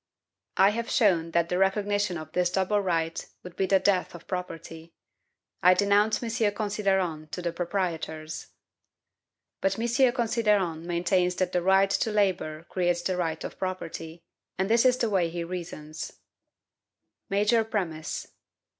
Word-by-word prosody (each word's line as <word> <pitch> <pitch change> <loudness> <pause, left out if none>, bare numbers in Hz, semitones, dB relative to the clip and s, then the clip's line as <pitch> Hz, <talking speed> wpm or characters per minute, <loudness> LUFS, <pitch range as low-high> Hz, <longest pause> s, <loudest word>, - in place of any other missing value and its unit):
I 195 +2 +6
have 230 +2 -3
shown 175 -8 +3
that 170 0 +1
the 180 - 0
recognition 205 -1 +1
of 155 -1 -8
this 180 +1 +1
double 190 +3 +1
right 165 -3 -1 0.2
would 180 -1 -10
be 190 - 0
the 195 - +5
death 185 -2 +1
of 170 - -11
property. 165 -2 -6 0.7
I 180 +1 +6
denounce 205 +2 +3
M. 225 -2 +1
Considerant 190 -7 -1
to 180 - -3
the 170 - -1
proprietors! 165 -3 -3 1.1
But 195 0 +1
M. 240 +3 +3
Considerant 210 -9 +1
maintains 180 +1 +1
that 185 -1 0
the 180 - +1
right 190 +2 +4
to 220 - +1
labor 185 -7 0
creates 175 -1 0
the 185 - 0
right 165 -3 -2
of - - -7
property, 170 -3 -5 0.3
and 190 +3 0
this 230 +2 +4
is 255 0 +5
the 235 - +1
way 180 -4 +2
he 170 +1 -4
reasons: 165 -3 -6 1.2
Major 210 +3 +3
Premise. 180 -8 -3
185 Hz, 145 wpm, -27 LUFS, 170-205 Hz, 1.2 s, I